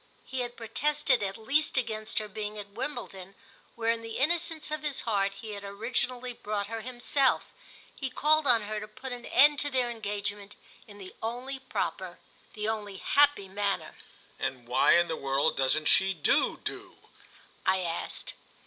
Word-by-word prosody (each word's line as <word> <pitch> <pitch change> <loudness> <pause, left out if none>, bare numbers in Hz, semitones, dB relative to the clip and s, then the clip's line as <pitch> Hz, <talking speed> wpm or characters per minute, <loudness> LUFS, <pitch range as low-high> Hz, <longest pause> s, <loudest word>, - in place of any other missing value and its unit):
He 260 - -4
had 245 -1 -3
protested 255 +3 +1
at 195 0 -2
least 275 +7 +1
against 220 -3 -2
her 215 -1 0
being 210 +1 -5
at 205 -1 -7
Wimbledon, 200 -6 -5 0.4
where 230 0 +1
in 230 0 -2
the 225 0 -6
innocence 325 +1 +1
of 305 0 -2
his 295 -3 -1
heart 200 -3 +1
he 215 +2 -8
had 200 -1 -6
originally 245 +4 -2
brought 210 -3 -3
her 225 +2 -5
himself; 255 +3 +1 0.4
he 270 - -3
called 305 +3 +3
on 235 -4 +5
her 215 +1 -3
to 210 - -7
put 255 +4 -8
an 245 -1 -6
end 290 +1 +6
to 290 - +1
their 255 -3 +1
engagement 205 -2 -4 0.3
in 205 -1 -12
the 190 -2 -10
only 250 +4 -3
proper, 265 -1 -3 0.4
the 210 -1 -3
only 210 -3 -3
happy 285 -3 +4
manner. 200 +1 -1 0.5
"And 130 -2 -3
why 125 +6 +5
in 175 0 +3
the 165 - -1
world 140 +1 +1
doesn't 135 +3 +1
she 190 +3 +4
do 150 - +2
do?" - - -6 0.7
I 190 0 +3
asked. 170 -2 -3
220 Hz, 170 wpm, -29 LUFS, 200-255 Hz, 0.7 s, end